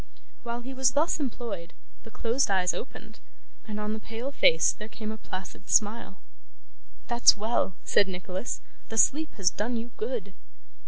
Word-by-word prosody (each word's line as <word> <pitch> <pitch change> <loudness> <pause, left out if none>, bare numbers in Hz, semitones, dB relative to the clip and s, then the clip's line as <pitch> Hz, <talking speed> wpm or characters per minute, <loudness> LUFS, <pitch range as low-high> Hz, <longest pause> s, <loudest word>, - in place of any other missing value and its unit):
While 235 0 -4
he 260 +2 -7
was 260 -1 +3
thus 315 +4 +2
employed, 230 - -4 0.3
the - - -12
closed 235 +3 +1
eyes 185 -2 +3
opened, 220 -3 -8 0.5
and 210 -1 -4
on 210 0 -2
the 220 - -4
pale 230 +5 -5
face 160 -11 +5
there 215 +1 -9
came 215 -1 -5
a 220 - -6
placid 185 -1 -8
smile. 215 -2 +2 0.9
'That's 240 -2 +6
well!' 215 -3 0
said 200 - +4
Nicholas. 185 +3 -4 0.3
'The 225 - -4
sleep 310 +7 +3
has 185 -3 +2
done 230 +4 -1
you 235 +2 -5
good. 470 +2 -3
225 Hz, 160 wpm, -28 LUFS, 200-245 Hz, 0.9 s, That's